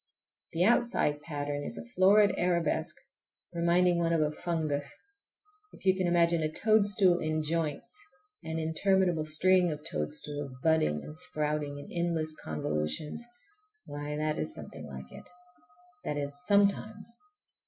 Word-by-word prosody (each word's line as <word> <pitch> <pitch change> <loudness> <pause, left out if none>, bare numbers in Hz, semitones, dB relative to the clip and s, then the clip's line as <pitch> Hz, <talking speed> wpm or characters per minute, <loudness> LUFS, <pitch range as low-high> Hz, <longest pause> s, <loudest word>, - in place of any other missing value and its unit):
The 165 +2 +2
outside 220 -9 +2
pattern 145 -1 -4
is - - -5
a - - -7
florid 200 +2 +5
arabesque, 175 -2 0 0.6
reminding 170 +1 +3
one 170 -1 +1
of 165 - +2
a 150 -1 +1
fungus. 150 -4 -2 0.8
If - - -15
you 190 -1 +5
can 185 -1 0
imagine 170 -1 +3
a 155 0 -1
toadstool 200 -3 +3
in 155 -1 -1
joints, 165 - -3 0.4
an 160 0 -4
interminable 170 +1 +1
string 180 +3 +3
of 150 0 -7
toadstools, 140 - -3
budding 75 - +2
and 75 +1 -9
sprouting 150 - -2
in 145 - -9
endless 170 -2 -1
convolutions,—why, 150 - -5
that 155 0 -1
is 80 - -3
something - - -9
like 65 -2 -9
it. - - -12 0.7
That 150 - -3
is, 145 0 -4
sometimes! 205 +2 +1
160 Hz, 130 wpm, -30 LUFS, 145-185 Hz, 0.8 s, florid